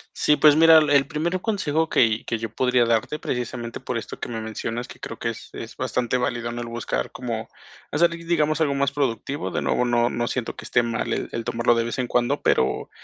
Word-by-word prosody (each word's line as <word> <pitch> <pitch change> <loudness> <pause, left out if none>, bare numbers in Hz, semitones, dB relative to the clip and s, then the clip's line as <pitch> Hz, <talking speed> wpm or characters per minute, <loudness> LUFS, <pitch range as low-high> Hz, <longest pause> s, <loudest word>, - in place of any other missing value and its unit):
Sí, 150 - +3
pues 150 -1 +6
mira, 165 0 +8
el 155 -1 +5
el 140 -2 +4
primer 165 +4 -2
consejo 160 -7 0
que 115 -5 +2
que 115 - -1
yo 110 -1 -6
podría 125 -1 +3
darte, 115 +5 0
precisamente 120 -3 -4
por 125 - -4
esto 115 - -6
que - - -4
me 115 -2 -4
mencionas, 115 +2 -4
que - - -13
creo - - -7
que - - -1
es - - -9
es - - -7
bastante 125 0 -1
válido, 120 -2 -2
¿no?, 120 - -5
el 120 - -5
buscar 115 - -3
cómo 115 -3 -4 0.4
hacer, 170 +3 +3
di 170 0 -8
digamos, 155 -2 +1
algo 145 -3 +2
más 140 0 +1
productivo, 135 -5 -2
de - - -2
nuevo, 125 - +1
no 120 0 +2
no 120 0 -1
siento 125 -3 -3
que - - -10
esté 120 - +3
mal 115 0 -2
el - - -4
el 115 - -3
tomarlo 120 +1 +2
de 115 0 +1
vez 120 - -4
en 125 -1 -1
cuando, 120 0 +1
pero 65 - +1
125 Hz, 235 wpm, -24 LUFS, 115-150 Hz, 0.4 s, mira